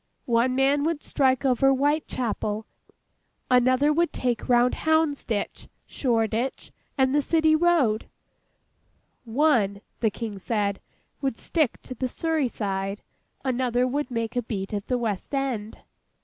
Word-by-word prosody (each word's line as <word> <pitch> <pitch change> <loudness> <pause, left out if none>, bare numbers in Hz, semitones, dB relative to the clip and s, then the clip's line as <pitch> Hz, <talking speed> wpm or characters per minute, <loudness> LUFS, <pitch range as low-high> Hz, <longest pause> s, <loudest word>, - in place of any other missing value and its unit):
One 240 +1 +2
man 275 +2 +3
would 315 -1 -1
strike 260 -1 +1
over 265 +1 +4
Whitechapel, 260 -6 0 0.9
another 255 +4 +4
would 340 +2 +1
take 245 -2 -2
round 245 0 +4
Houndsditch, 305 -9 0 0.2
Shoreditch, 230 0 -1 0.3
and 265 0 +3
the 295 - +3
City 315 +1 +3
Road; 310 -10 +2 1.2
one 225 -6 +2 0.2
(the 225 - +2
King 210 -1 -6
said) 200 -1 -1 0.4
would 270 -5 -1
stick 310 -8 0
to - - -7
the 255 +1 -2
Surrey 320 +1 0
side; 195 -3 -3 0.4
another 250 -1 +1
would 280 +2 -2
make 230 -1 -3
a 245 - +1
beat 205 -3 -5
of 205 -1 -3
the 250 - +1
West 225 +2 -3
end. 245 -6 -3
250 Hz, 130 wpm, -25 LUFS, 225-285 Hz, 1.2 s, over